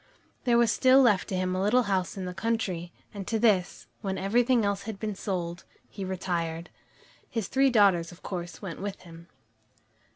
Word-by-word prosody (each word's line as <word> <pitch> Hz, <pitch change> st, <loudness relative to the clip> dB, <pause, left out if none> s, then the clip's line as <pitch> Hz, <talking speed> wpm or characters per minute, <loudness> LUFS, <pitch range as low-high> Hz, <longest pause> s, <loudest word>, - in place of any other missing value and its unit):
There 240 Hz, -2 st, +4 dB
was 235 Hz, -2 st, +4 dB
still 260 Hz, +4 st, +5 dB
left 220 Hz, -8 st, +4 dB
to 190 Hz, -, -3 dB
him 185 Hz, 0 st, 0 dB
a 185 Hz, -, -1 dB
little 245 Hz, +6 st, +3 dB
house 190 Hz, -3 st, -1 dB
in 190 Hz, -, -4 dB
the 180 Hz, -, -5 dB
country, 190 Hz, -4 st, -2 dB, 0.2 s
and 200 Hz, -2 st, -7 dB
to 225 Hz, -, 0 dB
this, 205 Hz, -5 st, +1 dB, 0.2 s
when 195 Hz, -3 st, -2 dB
everything 235 Hz, +3 st, +2 dB
else 200 Hz, -1 st, 0 dB
had 215 Hz, -, -5 dB
been 215 Hz, -1 st, -3 dB
sold, 175 Hz, -3 st, -4 dB, 0.2 s
he 195 Hz, -, -7 dB
retired. 175 Hz, -3 st, -3 dB, 0.6 s
His 225 Hz, -5 st, -3 dB
three 270 Hz, 0 st, +3 dB
daughters, 195 Hz, -8 st, +4 dB
of 175 Hz, -, -16 dB
course, 175 Hz, +1 st, -6 dB
went 185 Hz, -3 st, -6 dB
with 200 Hz, -1 st, -5 dB
him. 170 Hz, -1 st, -13 dB
195 Hz, 185 wpm, -28 LUFS, 180-225 Hz, 0.6 s, still